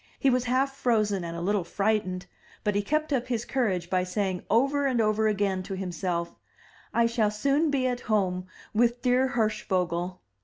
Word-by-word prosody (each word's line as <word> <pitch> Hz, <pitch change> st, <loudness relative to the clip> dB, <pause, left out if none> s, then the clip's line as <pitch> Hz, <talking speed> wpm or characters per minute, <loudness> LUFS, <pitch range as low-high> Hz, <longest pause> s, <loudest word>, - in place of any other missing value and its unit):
He 270 Hz, -, +3 dB
was 250 Hz, 0 st, +1 dB
half 265 Hz, +2 st, +1 dB
frozen 215 Hz, -7 st, +1 dB
and 170 Hz, 0 st, -5 dB
a -, -, -4 dB
little 200 Hz, +1 st, +1 dB
frightened, 185 Hz, -1 st, -1 dB, 0.4 s
but 210 Hz, -, +1 dB
he 205 Hz, -, +1 dB
kept 305 Hz, +7 st, 0 dB
up 250 Hz, -2 st, 0 dB
his 240 Hz, -2 st, -2 dB
courage 195 Hz, -10 st, 0 dB
by 185 Hz, 0 st, +1 dB
saying 185 Hz, 0 st, -2 dB
over 275 Hz, +6 st, +3 dB
and 255 Hz, -3 st, +1 dB
over 215 Hz, 0 st, +2 dB
again 200 Hz, -3 st, 0 dB
to 195 Hz, +1 st, -5 dB
himself, 175 Hz, -2 st, -3 dB, 0.6 s
"I 235 Hz, -, +3 dB
shall 230 Hz, -2 st, +2 dB
soon 280 Hz, +9 st, +1 dB
be 275 Hz, -3 st, +1 dB
at 250 Hz, -1 st, 0 dB
home 185 Hz, -5 st, 0 dB, 0.3 s
with 240 Hz, +2 st, +2 dB
dear 255 Hz, +1 st, +3 dB
Hirschvogel. 185 Hz, -7 st, -1 dB
215 Hz, 180 wpm, -27 LUFS, 185-250 Hz, 0.6 s, He